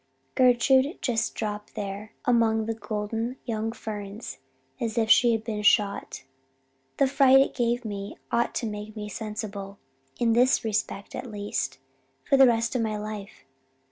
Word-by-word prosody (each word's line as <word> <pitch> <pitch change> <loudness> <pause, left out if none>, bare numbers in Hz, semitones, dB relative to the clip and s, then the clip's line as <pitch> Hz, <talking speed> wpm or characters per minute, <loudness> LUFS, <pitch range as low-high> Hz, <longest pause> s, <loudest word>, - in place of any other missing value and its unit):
Gertrude 260 - +4
just 230 -3 0
dropped 210 -1 -5
there 205 +1 -5
among 225 -2 +3
the 225 - -1
golden 225 +3 -3
young 225 -2 -2
ferns 210 -1 -7 0.4
as 230 0 -3
if 220 -1 +3
she 240 -1 +6
had 225 -1 0
been 215 -2 -3
shot. 205 -7 +2 0.7
The 275 - +4
fright 270 0 +6
it 270 - +2
gave 240 -1 0
me 200 -1 -5
ought 235 0 +1
to - - -1
make 210 0 -6
me 210 -1 -5
sensible 210 -2 -6 0.4
in 230 -1 +2
this 250 +1 +3
respect 210 -2 -2
at 250 -1 -6
least 205 -8 -3 0.5
for 275 - +2
the 270 -1 +8
rest 230 +1 +1
of 245 - +1
my 215 -1 -1
life. 210 -7 -7
220 Hz, 155 wpm, -26 LUFS, 210-240 Hz, 0.7 s, the